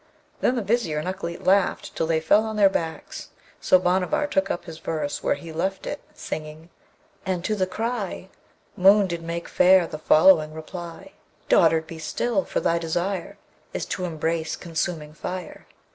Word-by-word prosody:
Then 255 - +2
the 235 - -1
Vizier 200 -7 0
and 150 - -3
Ukleet 170 -2 -5
laughed 195 0 +2
till 165 - 0
they 160 -1 +2
fell 200 +7 +4
on 220 -1 -4
their 200 -2 +5
backs; 290 - -4 0.3
so 185 - +5
Bhanavar 185 +8 +1
took 195 -9 0
up 175 - -3
his 160 -2 -9
verse 155 -3 -3
where - - +1
he 165 -1 -9
left 190 +4 -2
it, 290 - -4
singing, 155 +2 -7 0.5
And 185 -2 -2
to 215 - 0
the 190 -3 0
cry 215 -2 -3 0.5
Moon 195 +2 +6
did 170 -2 -4
make 170 +1 -5
fair 185 -1 +5
the 155 -2 -7
following 155 0 +5
reply: 170 +3 -8 0.4
'Dotard, 160 -1 +4
be 160 0 -9
still! 200 +5 -1
for - - -1
thy 170 - +1
desire 175 +3 -2 0.4
Is - - -2
to 185 - -3
embrace 160 0 -2
consuming 160 -2 -4
fire.' 180 +2 -7
175 Hz, 170 wpm, -24 LUFS, 160-195 Hz, 0.5 s, Moon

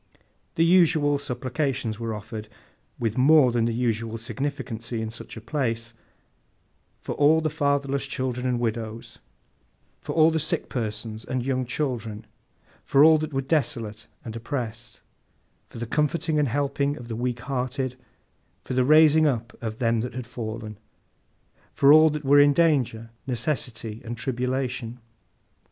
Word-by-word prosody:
The 165 - +3
usual 160 -5 +4
supplications 130 -3 -2
were 115 -1 -3
offered, 105 0 -8 0.5
with 115 0 -1
more 140 -1 +6
than 115 -1 +1
the 115 - 0
usual 115 -1 -1
significancy 120 -2 -4
in 110 0 -4
such 115 - -8
a - - -7
place, 115 -2 -2 1.1
for 150 +2 +3
the 155 -1 -1
fatherless 140 -2 0
children 130 -1 -2
and 125 -1 0
widows, 115 -1 -4 0.8
for - - -5
all 160 0 +5
sick 160 +1 -2
persons 110 -2 -4
and 125 -1 -3
young 130 -2 -1
children, 120 -6 -3 0.6
for 140 +1 +4
all 160 0 +7
that 155 0 -4
were 135 -1 -1
desolate 120 -7 -1 0.2
and 110 -1 -6
oppressed, 115 -1 -5 0.7
for - - -11
the 120 - -3
comforting 150 +5 0
and 145 - +2
helping 140 +2 -1
of 120 - -9
the 115 - -4
weak 120 +1 -2
hearted, 130 -1 -2 0.7
for - - -5
the 130 0 +3
raising 155 +2 +6
up 120 -3 -2
of 110 -1 -4
them 115 -1 +1
that 125 +2 -5
had 130 -2 -5
fallen; 110 -3 -6 0.9
for 140 +1 +6
all 155 +1 +7
that 150 -1 -4
were 145 +1 +6
in 145 0 +6
danger, 130 -9 +1 0.2
necessity, 115 -3 -3
and 120 +1 -6
tribulation. 125 -1 -2
125 Hz, 145 wpm, -25 LUFS, 115-145 Hz, 1.1 s, all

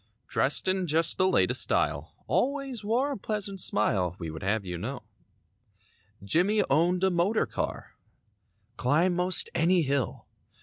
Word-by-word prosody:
Dressed 140 +6 +2
in 185 -1 0
just 165 +2 +1
the 185 - +3
latest 190 - +3
style; - - -1
Always 270 -4 -2
wore 245 +7 0
a - - -4
pleasant 200 -2 -2
smile. 95 - +2
We 85 -4 -6
would 80 - -9
have 100 +1 -2
you 90 -2 -6
know. - - -6 1.2
Jimmie 185 - +1
owned 175 +5 +1
a 190 - +3
motor 180 +6 0
car; - - -6 0.8
Climb 155 +8 +1
most 180 +1 +3
any 170 +1 +2
hill. 135 -5 -2
175 Hz, 140 wpm, -27 LUFS, 130-200 Hz, 1.2 s, the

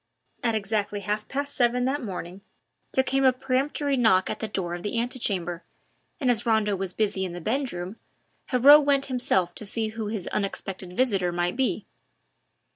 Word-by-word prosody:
At 230 -2 +1
exactly 205 -1 -1
half 210 +1 -2
past 285 +1 -3
seven 245 0 +2
that 280 +3 0
morning 185 -2 -6 0.5
there 265 - +3
came 270 +1 +1
a 260 - +7
peremptory 270 +2 0
knock 220 -7 +3
at - - -4
the 220 - -3
door 185 -4 -3
of 175 - -5
the 205 +5 -3
antichambre, 200 -8 -2 0.6
and 260 -5 +3
as 235 -1 +2
Rondeau 220 -3 +2
was 190 -1 -2
busy 205 -1 0
in 180 -2 -4
the 175 - -6
bedroom, 215 - -3 0.5
Heriot 280 +4 +8
went 280 -1 +2
himself 190 -9 +1
to - - -6
see 220 +2 -1
who 220 -1 -5
his 210 -4 -4
unexpected 195 -2 -3
visitor 195 -6 +1
might 175 0 -1
be. 265 0 0
220 Hz, 175 wpm, -26 LUFS, 190-255 Hz, 0.6 s, Heriot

